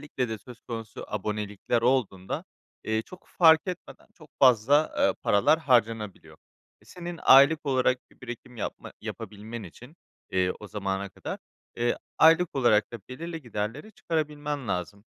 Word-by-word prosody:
Özellikle 130 -4 -3
de 110 -1 -4
söz 120 +3 -13
konusu 115 -2 -7
abonelikler 105 +2 -2
olduğunda, 115 -7 0 0.4
eee, 110 0 0
çok 185 +8 -14
fark 160 -2 +8
etmeden 180 -1 -7
çok 155 -2 -16
fazla, 135 +4 +5
eee, - - +3
paralar 105 +10 +4
harcanabiliyor. 115 - 0 0.5
Senin 175 -1 -8
aylık 145 +3 +7
olarak 130 -1 +2
bir - - -25
birikim 125 0 -9
yapma 105 - -6
yapabilmen 110 +2 -7
için, 125 - -13 0.3
eee, 90 -1 +1
o 105 - -8
zamana 100 -1 -3
kadar, - - -7 0.4
eee, 120 0 +1 0.2
aylık 165 +1 +5
olarak 120 -4 +3
da 120 - -6
belirli 165 +4 -6
giderleri 120 - -5
çıkarabilmen 150 - -3
lazım. 95 +3 -3
120 Hz, 140 wpm, -27 LUFS, 105-150 Hz, 0.5 s, fark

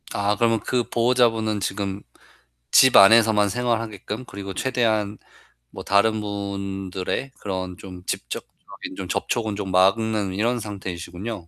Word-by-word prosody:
아 100 +1 +1
그러면 115 -1 +2
그 120 +3 -1
보호자분은 115 -3 +2
지금 100 +1 -3 0.7
집 130 -2 +6
안에서만 105 0 +6
생활하게끔 115 0 -3
그리고 100 -3 -7
최대한 110 -3 0 0.5
뭐 - - -9
다른 110 +2 +2
분들의 100 +2 -4
그런 95 -2 -4
좀 90 -1 -11
직접적인 - - -7
좀 - - -5
접촉은 110 -3 -2
좀 100 -2 -4
막는 100 +1 +2
이런 115 +5 0
상태이시군요. 95 -1 -6
105 Hz, 295 characters per minute, -23 LUFS, 95-115 Hz, 0.7 s, 집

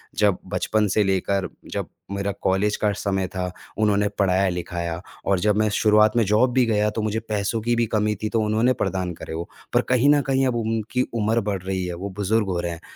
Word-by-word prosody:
जब 100 -3 +3 0.2
बचपन 110 -1 +1
से 105 - +3
लेकर 95 0 0 0.2
जब - - -3 0.2
मेरा 100 0 -1
कॉलेज 95 +3 +1
का 105 - +3
समय 95 -2 -1
था, 90 0 -4 0.3
उन्होंने 105 -1 +2
पढ़ाया-लिखाया 90 -3 0 0.2
और 95 -2 +2
जब 105 +2 +2
मैं 110 0 +2
शुरुआत 105 0 +4
में 115 - +5
जॉब 110 +5 +3
भी 130 -1 +4
गया 105 -2 +2
तो 110 - -3
मुझे 110 +1 -1
पैसों 105 +1 -1
की 120 +1 +1
भी 115 0 +2
कमी 105 0 +1
थी 110 - 0
तो 115 0 +1
उन्होंने 110 +4 +2
प्रदान 95 -7 -2
करे 80 - -8
वो। 85 +1 -5 0.2
पर - - +4
कहीं 125 +3 +4
न 145 0 +5
कहीं 135 -1 +1
अब 120 - 0
उनकी 115 +1 -1
उम्र 115 +1 +1
बढ़ 100 -3 -2
रही 95 -1 -2
है, 90 - -4
वो 95 +4 -5
बुजुर्ग 105 +2 0
हो 90 -2 -1
रहे 85 - -3
हैं, 85 - -8
105 Hz, 220 wpm, -23 LUFS, 95-110 Hz, 0.3 s, में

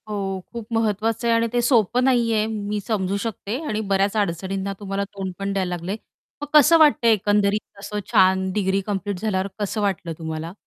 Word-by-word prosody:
हो, 195 -2 -3
खूप 235 -2 -6
महत्वाचं 225 +1 0
आहे 230 - +4
आणि 230 0 +2
ते 240 - +2
सोपं 240 -1 +3
नाहीये, 230 -4 +2
मी 210 -1 -3
समजू 200 -3 0
शकते 225 0 -4
आणि 215 0 -1
बऱ्याच 195 +2 +2
अडचणींना 195 +1 -2
तुम्हाला 200 -1 -3
तोंड 195 -2 -6
पण 200 0 -2
द्यायला 190 -2 -1
लागलंय. 180 +5 -4 0.4
मग 290 - -4
कसं 300 +2 +7
वाटतंय 290 -7 +5
एकंदरीत 205 0 0
असं 210 +1 -4
छान 190 0 +4
डिग्री 195 -1 +1
कंप्लीट 200 -2 -2
झाल्यावर 195 -2 -1
कसं 210 +1 -2
वाटलं 190 -4 -1
तुम्हाला? 160 +1 -5
205 Hz, 175 wpm, -23 LUFS, 190-225 Hz, 0.4 s, कसं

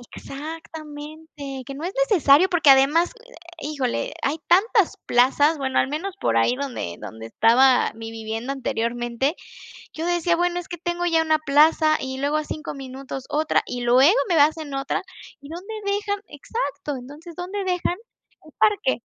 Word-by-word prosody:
Exactamente, 300 -1 -8
que 275 - -6
no 295 - -8
es 365 +4 -3 0.2
necesario, 335 -2 +5
porque 325 -6 +5
además, 285 +6 +4 0.2
eh, - - -19 0.4
híjole, 275 -5 -2
hay 290 +4 0
tantas 400 +2 +3
plazas, 280 +6 +3
bueno, 265 -1 -1
al - - +3
menos 350 +7 -4
por - - 0
ahí 115 - +3
donde 250 - -4
donde 110 +2 -8
estaba 245 - +4
mi 225 0 -8
vivienda 225 +4 -4
anteriormente, 240 +2 -2 0.6
yo 325 +2 -4
decía: 345 -1 +1
"Bueno, 350 +1 0
es 355 - -13
que 345 - -6
tengo 350 +1 -2
ya 330 -1 +3
una 315 -1 +2
plaza 310 +1 +4
y 265 0 -5
luego 285 +2 0
a 305 - -1
5 310 +2 -6
minutos 270 -1 -7
otra, 310 +1 +1
y 245 - -5
luego 245 +3 +5 0.2
me 345 - +2
hacen 300 -1 +2
otra. 275 +1 -2 0.4
¿Y 280 - -12
dónde 360 +7 -7
dejan". 405 0 -1
Exacto. 285 - -4
Entonces, 290 +7 -11
¿dónde 375 +3 -4
dejan 360 -1 -1 0.5
el - - -16
parque? 405 - +2
295 Hz, 165 wpm, -23 LUFS, 265-345 Hz, 0.6 s, necesario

